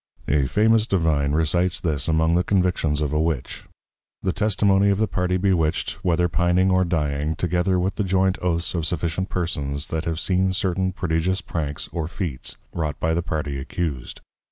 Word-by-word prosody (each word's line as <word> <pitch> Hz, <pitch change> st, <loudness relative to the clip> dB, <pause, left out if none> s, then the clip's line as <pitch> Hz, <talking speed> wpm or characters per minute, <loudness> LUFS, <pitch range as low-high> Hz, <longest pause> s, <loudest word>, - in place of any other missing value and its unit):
A 70 Hz, -2 st, +2 dB
famous 110 Hz, -, +3 dB
Divine 80 Hz, -7 st, +1 dB
recites 80 Hz, +2 st, +2 dB
this 75 Hz, -4 st, -1 dB
among 80 Hz, 0 st, +2 dB
the 90 Hz, +1 st, +3 dB
Convictions 90 Hz, -6 st, +1 dB
of 75 Hz, -1 st, -1 dB
a 75 Hz, -, +2 dB
Witch; 80 Hz, -5 st, -3 dB, 0.6 s
_The 95 Hz, -, +1 dB
Testimony 100 Hz, -1 st, +2 dB
of 100 Hz, -, +2 dB
the 110 Hz, -, +2 dB
party 90 Hz, 0 st, 0 dB
Bewitched, 90 Hz, -5 st, 0 dB
whether 90 Hz, 0 st, +2 dB
Pining 90 Hz, +2 st, +2 dB
or 95 Hz, 0 st, +4 dB
Dying; 75 Hz, -3 st, -1 dB
together 90 Hz, +3 st, +1 dB
with 95 Hz, +2 st, -1 dB
the 105 Hz, -, +1 dB
joint 95 Hz, 0 st, +1 dB
Oaths 85 Hz, -1 st, 0 dB
of 85 Hz, -3 st, -1 dB
sufficient 85 Hz, +3 st, -2 dB
Persons 75 Hz, -5 st, -2 dB
that 80 Hz, +1 st, -2 dB
have 80 Hz, -1 st, -2 dB
seen 95 Hz, 0 st, +1 dB
certain 95 Hz, -1 st, 0 dB
Prodigious 90 Hz, 0 st, -1 dB
Pranks 75 Hz, -3 st, -4 dB
or 80 Hz, -2 st, -3 dB
Feats 80 Hz, -, -4 dB, 0.2 s
wrought 75 Hz, -3 st, -3 dB
by 80 Hz, 0 st, +1 dB
the 85 Hz, -, 0 dB
Party 75 Hz, -5 st, -3 dB
Accused. 70 Hz, -2 st, -4 dB
85 Hz, 175 wpm, -23 LUFS, 80-95 Hz, 0.6 s, or